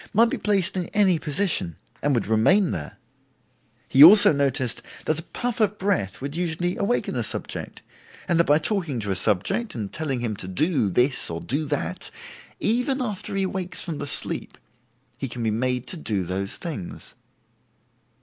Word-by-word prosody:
might 230 +2 +4
be - - -2
placed 195 -4 +1
in 180 -2 -2
any 190 -5 +3
position 150 - -1 0.3
and 145 -1 +1
would 115 - 0
remain 135 - +3
there; 75 -2 -6 0.9
he 135 - +7
also 205 +2 +9
noted 135 -4 -1 0.2
that 155 0 0
a - - -5
puff 240 +8 -4
of 210 -1 +1
breath 185 - -1
would 140 +2 -5
usually 175 +1 -2
awaken 205 +5 -1
a - - -1
subject, - - -4 0.4
and 170 -2 +1
that 170 - +4
by 145 - +4
talking 160 - -1
to 100 -2 -3
a - - 0
subject 110 - 0
and 105 -4 -5
telling 140 -5 -2
him 115 -3 -3
to 95 - -6
do 140 - 0
this 125 +8 +1
or 85 0 -4
do 145 - -2
that, 135 - -2 0.5
even 250 +5 0
after 210 -6 -4
he 195 - 0
awakes 185 -1 -3
from 165 -5 -5
the 145 - -4
sleep, - - +5 0.6
he 135 - -3
can 120 -1 -6
be 110 - 0
made 125 +2 -1
to 175 - -4
do 105 - -2
those 95 +3 -3
things. 150 - -7
150 Hz, 180 wpm, -24 LUFS, 115-190 Hz, 0.9 s, also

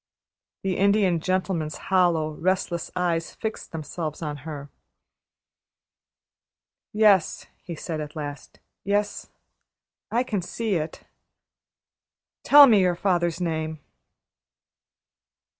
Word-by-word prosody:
The 190 -2 -1
Indian 200 -3 +3
Gentleman's 180 -3 -1
hollow, 175 -5 +1
restless 175 +1 -1
eyes 170 -2 -1
fixed 220 -1 -5
themselves 155 0 -5
on 150 -1 -4
her. 145 -1 -8 2.2
"Yes," 210 -5 +3 0.2
he 170 - -7
said 155 0 -5
at 150 -1 -8
last. 145 -3 -7 0.2
"Yes; 205 +1 -1 0.8
I 240 +2 +1
can 215 -6 -2
see 220 +4 -3
it. 155 -2 -3 1.4
Tell 290 0 +9
me 225 -6 +5
your 180 -2 +2
father's 175 -2 0
name." 160 -2 -3
175 Hz, 95 wpm, -25 LUFS, 155-195 Hz, 2.2 s, Tell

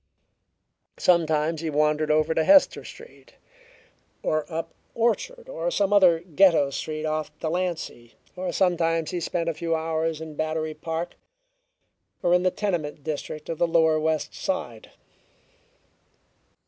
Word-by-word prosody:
Sometimes 160 -2 +2
he 165 - -2
wandered 150 +1 +1
over 155 +1 +2
to 160 - +2
Hester 290 - +5
Street, 470 +1 -14 0.9
or 155 +1 -1
up 165 0 -4 0.2
Orchard 465 - -1
or - - -3
some 205 - +1
other 180 -5 +5
Ghetto 170 -4 +3
street 155 +2 -4
off 155 0 -2
Delancey, 165 -8 -3 0.2
or 180 -1 -3
sometimes 165 -3 +1
he 180 - -2
spent 170 0 -2
a 165 - 0
few 165 +1 -1
hours 160 0 -1
in 160 -1 -7
Battery 155 +1 -2
Park 165 +2 -5 1.1
or 175 - +3
in 180 - +4
the 185 - +3
tenement 170 -8 -3
district 155 0 -5
of 165 - -4
the 175 - +3
lower 160 -1 +3
West 155 -1 -1
Side. 120 -12 -4
160 Hz, 135 wpm, -25 LUFS, 155-180 Hz, 1.1 s, Hester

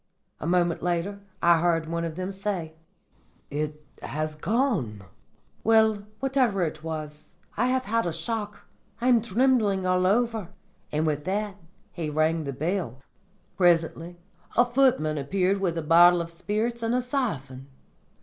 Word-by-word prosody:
"A 150 - -4
moment 175 -1 +2
later 180 +3 -1 0.2
I 170 -1 +6
heard 165 -1 +1
one 170 +1 -2
of 160 -1 -5
them 185 +2 -3
say, 190 -5 -3 0.8
'It 150 +1 -4 0.2
has 155 +2 -3
gone. 165 - -1 0.6
Well, 220 -2 +3
whatever 255 -8 +1
it 155 -1 -4
was, 155 -2 -6 0.3
I 240 +4 +1
have 260 0 0
had 230 -1 0
a - - -1
shock. 210 +3 -4 0.3
I 245 - +1
am 240 -2 +5
trembling 220 -3 +2
all 185 0 +2
over.' 225 -2 +1 0.4
And 150 +1 0
with 150 -1 -1
that 205 +1 -2 0.3
he 165 -3 -4
rang 155 +1 +1
the 140 - -3
bell. 155 - -3 0.5
"Presently 170 -1 +2 0.4
a 240 - +6
footman 240 - +2
appeared 190 +7 0
with 170 -3 0
a 165 - -2
bottle 175 +2 +6
of 170 0 -6
spirits 215 +7 -2
and 230 +1 0
a 250 - +2
siphon. 140 - -3
180 Hz, 150 wpm, -26 LUFS, 160-220 Hz, 0.8 s, I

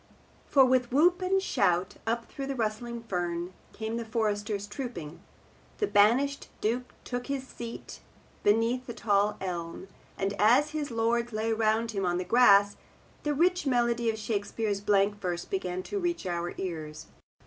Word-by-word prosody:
For 270 -2 +6
with 255 -1 +2
whoop 350 +7 +4
and 380 +1 +2
shout, 190 - +1
up 230 +1 0
through 275 -1 -6
the 275 - -2
rustling 235 +1 -3
fern 175 -3 -3 0.2
came 220 +1 -4
the 235 - -3
foresters 210 -2 -1
trooping, 205 - -7 0.6
the 415 - +1
banished 260 - +3
Duke 245 +4 -2
took 245 0 -4
his 275 -2 -3
seat 235 -2 -8 0.4
beneath 230 +4 +2
the 235 - -6
tall 205 -2 +1
elm, 175 0 -5 0.3
and 195 +1 -1
as 250 +8 +5
his 305 -2 -3
lords 235 0 0
lay 220 +1 -1
around 225 +1 +1
him 195 -3 -2
on 175 -1 +1
the 180 - -1
grass, 205 -1 +5 0.4
the 295 -1 -1
rich 355 +1 +2
melody 240 -2 +2
of 220 - -1
Shakespeare's 210 -1 -2
blank 205 0 +2
verse 175 -2 -2
began 185 -1 -3
to 405 - -3
reach 350 - -2
our 175 -1 -3
ears. 155 -5 -5
225 Hz, 160 wpm, -29 LUFS, 200-250 Hz, 0.6 s, For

